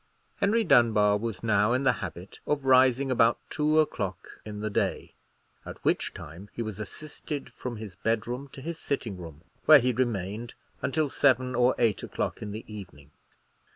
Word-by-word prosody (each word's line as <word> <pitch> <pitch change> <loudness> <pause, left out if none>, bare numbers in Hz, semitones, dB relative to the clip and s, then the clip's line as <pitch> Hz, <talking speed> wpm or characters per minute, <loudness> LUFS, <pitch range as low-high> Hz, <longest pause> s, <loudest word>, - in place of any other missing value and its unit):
Henry 220 +3 +2
Dunbar 110 - +4
was 115 -2 -4
now 105 0 +3
in 130 +2 +1
the 130 - +5
habit 90 +1 -7
of 145 -2 0
rising 130 0 +4
about 115 -1 +4
two 155 +1 +2
o'clock 100 - -2
in 105 -1 -7
the 110 +1 -2
day, - - -1 0.5
at - - -8
which - - +1
time 85 +7 -10
he 120 - -3
was 110 -2 -6
assisted 145 +6 -7
from 125 -2 -5
his 105 -4 -8
bedroom 115 +6 -2
to 135 - -9
his 165 +3 -5
sitting 120 -7 -3
room, 80 -3 -10 0.2
where 155 0 +10
he 125 -1 +1
remained 115 -2 -2 0.3
until 155 +2 +1
seven 130 -2 +2
or 125 +1 +3
eight 115 -4 +2
o'clock - - -3
in 105 - -5
the 110 +2 -7
evening. 90 -9 -10
115 Hz, 170 wpm, -28 LUFS, 105-135 Hz, 0.5 s, where